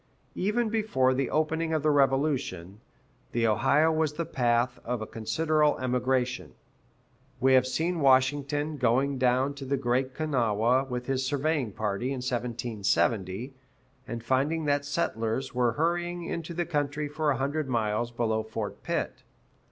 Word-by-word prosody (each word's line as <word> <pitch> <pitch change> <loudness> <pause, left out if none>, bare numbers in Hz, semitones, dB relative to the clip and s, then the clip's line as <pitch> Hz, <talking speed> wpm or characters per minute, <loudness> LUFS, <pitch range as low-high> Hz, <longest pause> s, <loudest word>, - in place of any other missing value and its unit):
[B] - - -6
Even 230 +2 +1
before 210 -13 +2
the 130 0 -1
opening 160 +1 0
of 155 - -1
the 155 - +4
Revolution, 135 - 0 0.5
the 115 -1 +1
Ohio 135 +8 +3
was 155 -2 0
the 170 +2 -3
path 120 -2 +1
of 125 0 -2
a 110 - -4
considerable 150 +7 +1
emigration. 125 0 -1 0.8
We 130 +1 +4
have 130 0 +5
seen 165 +6 -1
Washington 145 +2 +2
going 130 +2 +1
down 130 +2 +2
to 140 -1 -9
the 140 +1 0
Great 130 +1 0
Kanawha 125 -4 +1
with 125 -1 -4
his 135 0 -1
surveying 145 -2 0
party, 105 +3 -2
in 135 - -1
1770, 115 -2 -1 0.5
and 115 -2 -5
finding 145 +6 +1
that 145 -1 +1
settlers 130 -5 -2
were 120 -2 +2
hurrying 175 +3 -1
into 170 0 -5
the 175 0 -1
country 150 -2 -1
for 150 +1 -1
a 135 - +1
hundred 140 +2 -2
miles 115 -1 0
below 115 -2 0
Fort 110 -1 -5
Pitt. - - -3
130 Hz, 150 wpm, -28 LUFS, 120-150 Hz, 0.8 s, have